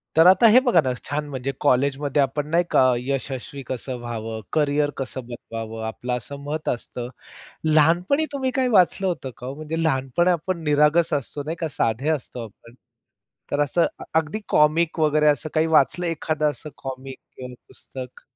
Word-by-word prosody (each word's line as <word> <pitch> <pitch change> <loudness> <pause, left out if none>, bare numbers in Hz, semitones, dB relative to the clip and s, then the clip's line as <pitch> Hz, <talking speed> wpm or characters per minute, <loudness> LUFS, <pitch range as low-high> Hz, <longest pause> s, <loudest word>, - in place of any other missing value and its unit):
तर 165 +2 +7
आता 190 +5 +7
हे 245 +4 +8
बघा 180 -10 +5
ना, 130 -2 -1
छान 150 +2 -3
म्हणजे 135 0 -3
कॉलेजमध्ये 140 +1 +2
आपण 145 +2 -1
नाही 170 +2 +3
का, 130 -1 +5
यशस्वी 135 +2 -4
कसं 130 0 -4
व्हावं? 115 -2 -5
करियर 145 -1 +2
कसं 130 -1 -5
बनवावं 115 -2 -7
आपलं? 125 +2 -4
असं 140 +5 -8
मत 155 +2 -3
असतं. 120 0 -4 0.6
लहानपणी 175 - +3
तुम्ही 260 -2 -1
काय 260 -1 +2
वाचलं 190 -2 +3
होतं 165 -7 -3
का 125 - -8
ओ? 135 - -5
म्हणजे 155 +2 -4
लहानपणी 150 +4 +2
आपण 170 0 -2
निरागस 150 +3 +3
असतो. 145 0 -3
नाही 160 +3 -4
का 165 - -1
साधे 115 +7 +1
असतो 125 -5 -3
आपण. 115 +2 -16 0.8
तर 145 - 0
असं 145 +4 +2 0.3
अगदी 160 +6 +1
कॉमिक 160 +2 +3
वगैरे 150 0 +3
असं 150 +1 +2
काही 160 0 +2
वाचलं 160 +3 +3
एखादं 155 -2 0
असं 145 +3 -9
कॉमिक 135 0 -7 0.2
किंवा 125 -1 -8
पुस्तक. 130 -1 -10
145 Hz, 165 wpm, -23 LUFS, 130-160 Hz, 0.8 s, हे